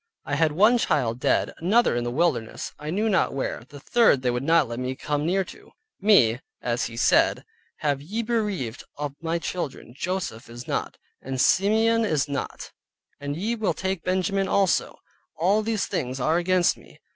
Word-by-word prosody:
I - - -4
had 155 +1 +2
one 215 +8 +5
child 125 - 0
dead, - - +1
another 205 - +3
in 120 - -1
the 120 - -2
wilderness, 125 -5 -1
I 150 +1 -6
knew 205 +7 0
not 190 -9 +1
where, 130 -3 -3
the 145 - -11
third 185 - +3
they 125 - +2
would 125 0 -2
not 160 0 +3
let 120 +1 -5
me 130 +1 -3
come 150 +2 -2
near 190 +2 +2
to: - - -14 0.3
"Me 135 - +4 0.2
(as 120 0 -1
he 115 - -7
said) - - +3 0.3
have 145 -2 -1
ye 210 +10 -3
bereaved 210 - -2
of 145 -1 -4
my 165 +1 -1
Children, 165 -8 -5
Joseph 165 -9 -4
is 120 +1 -9
not, - - -3 0.2
and 135 0 -5
Simeon 220 - +3
is 155 -9 +1
not, 140 -1 -5 0.5
and 145 +1 -4
ye 215 +7 -1
will 220 -3 -1
take 190 -2 -2
Benjamin 190 +1 0
also, 195 -1 +1 0.4
all 195 +6 +3
these 220 -1 -1
things 130 -1 -3
are 155 +6 +2
against 180 0 +2
me." - - -18
165 Hz, 180 wpm, -25 LUFS, 130-195 Hz, 0.5 s, one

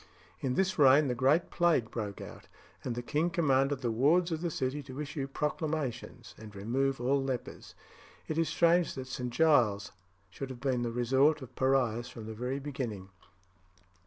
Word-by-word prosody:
In 130 -2 -1
this 190 -1 0
reign 140 +1 +6
the - - +1
great 135 +7 +2
plague 165 -10 +2
broke 105 -4 -5
out, - - -10 0.4
and 120 - -3
the 120 - -4
king 155 +7 0
commanded 140 -5 +1
the 120 -3 0
wards 160 +10 +3
of 160 -1 -2
the 175 - -1
city 135 -1 -2
to 130 0 -9
issue 145 -2 -4
proclamations 150 -2 -3
and 105 -2 -11
remove 130 +7 -1
all 135 +3 +1
lepers. 130 -3 -5 0.5
It 155 +1 -2
is 165 - +1
strange 170 0 +3
that 130 -1 -5
St. 125 -1 -4
Giles's 120 -9 +3 0.4
should 135 +6 -6
have 130 -2 -8
been 130 -2 0
the 120 - -1
resort 135 +5 +2
of 130 - -12
pariahs 125 -3 +1
from 115 -3 -9
the 110 - -6
very 125 +4 -3
beginning. 125 -9 -5
135 Hz, 175 wpm, -31 LUFS, 120-150 Hz, 0.5 s, reign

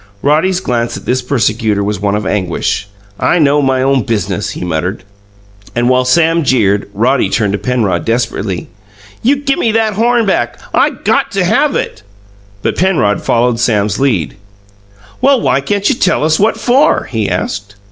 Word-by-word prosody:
Roddy's 160 +6 +2
glance 120 -8 -2
at - - -11
this 130 +1 0
persecutor 110 -5 0
was 105 0 -2
one 100 0 0
of 105 -1 -3
anguish. 95 0 -1 0.3
"I 175 - +2
know 145 -2 +3
my 130 -1 +1
own 135 -1 +2
biz'nuss!" 105 -5 -2
he - - -6
muttered. 90 +4 -3 0.7
And 120 +1 +1
while 130 0 +2
Sam 165 +4 +3
jeered, 105 -7 +1
Roddy 125 +5 +1
turned 105 -4 0
to 100 - -1
Penrod 105 -6 0
desperately. 110 -5 -2 0.5
"You 265 +5 +3
gimme 275 -5 0
that 220 -1 +1
horn 235 +2 +2
back! 120 -11 -1
I - - +3
got - - -1
to - - +1
have - - +2
it." - - -3 0.6
But - - -1
Penrod 160 - +1
followed 120 0 +1
Sam's 105 -5 0
lead. 115 - 0 0.8
"Well, 275 -1 +4
why 140 - +1
can't 200 +6 -1
you - - +3
tell 185 -8 +1
us 155 0 +2
what 215 +3 +2
FOR?" 270 +5 +3
he 110 -5 -2
asked. 100 +3 -3
125 Hz, 165 wpm, -13 LUFS, 105-165 Hz, 0.8 s, Well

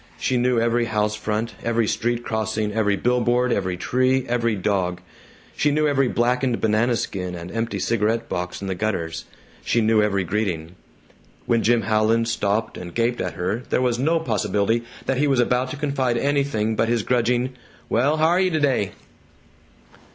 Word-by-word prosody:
She 130 - -1
knew 125 -1 +2
every 120 +1 +1
house 105 -1 0
front, 110 +2 -2
every 115 -1 +1
street 120 +2 -1
crossing, 110 -1 -2
every 105 -2 +2
billboard, 125 +2 +1
every 95 -4 -1
tree, 130 +5 +1
every 115 -2 +1
dog. 90 -2 -1 0.6
She 150 - +2
knew 150 +1 +2
every 135 -2 +2
blackened 125 +1 +1
banana 110 +3 +2
skin 90 -5 -3
and 85 +1 -8
empty 115 -1 -2
cigarette 115 +3 0
box 90 +2 -4
in - - -3
the 95 - -1
gutters. 85 -5 -3 0.4
She 120 - +1
knew 110 -1 +3
every 100 -2 +1
greeting. 90 -3 -2 0.7
When 115 -1 +2
Jim 115 0 +2
Howland 110 +2 +2
stopped 110 0 -1
and 85 -1 -9
gaped 120 +1 0
at 90 - -3
her 95 +6 -2
there - - +2
was 125 -2 +1
no 165 +5 +2
possibility 110 -3 0 0.2
that 135 - 0
he 150 - +3
was 135 -3 +2
about 125 +1 +1
to 145 - -6
confide 135 -4 0
anything 135 -5 0
but 115 +1 +1
his 120 -2 +1
grudging, 125 +2 +1 0.3
"Well, 140 +7 +2
haryuh 175 +4 +3
t'day?" 145 - +1
115 Hz, 165 wpm, -23 LUFS, 105-125 Hz, 0.7 s, knew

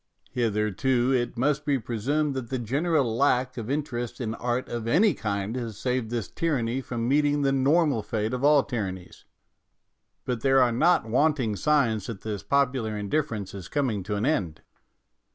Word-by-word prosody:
Hitherto, 120 +2 +1
it 120 -2 0
must 145 +4 +1
be 145 -2 +1
presumed 130 +6 -1
that 130 -3 -5
the 130 - -1
general 135 +1 0
lack 125 -1 +2
of 115 -1 -6
interest 130 -5 -3
in 110 -3 -2
art 120 +2 -2
of 115 -1 -4
any 185 - +4
kind 100 +1 -3
has 115 -5 -5
saved 125 -3 -1
this 115 -5 -3
tyranny 135 -6 -1
from 120 -2 -3
meeting 145 +1 +2
the 135 - +3
normal 140 -1 +2
fate 110 +2 -2
of 125 +1 -3
all 145 -1 +5
tyrannies, 95 -8 -5 1.0
but 125 -3 -2
there 135 +1 +4
are 125 -2 +4
not 165 +8 +3
wanting 125 -2 +1
signs 115 -4 +1
that 115 -5 -6
this 105 -3 -4
popular 130 -6 0
indifference 105 -1 -2
is 95 -3 -8
coming 125 -9 -1
to 105 +3 -3
an 100 +3 -1
end. 95 - -1
125 Hz, 170 wpm, -26 LUFS, 110-140 Hz, 1.0 s, all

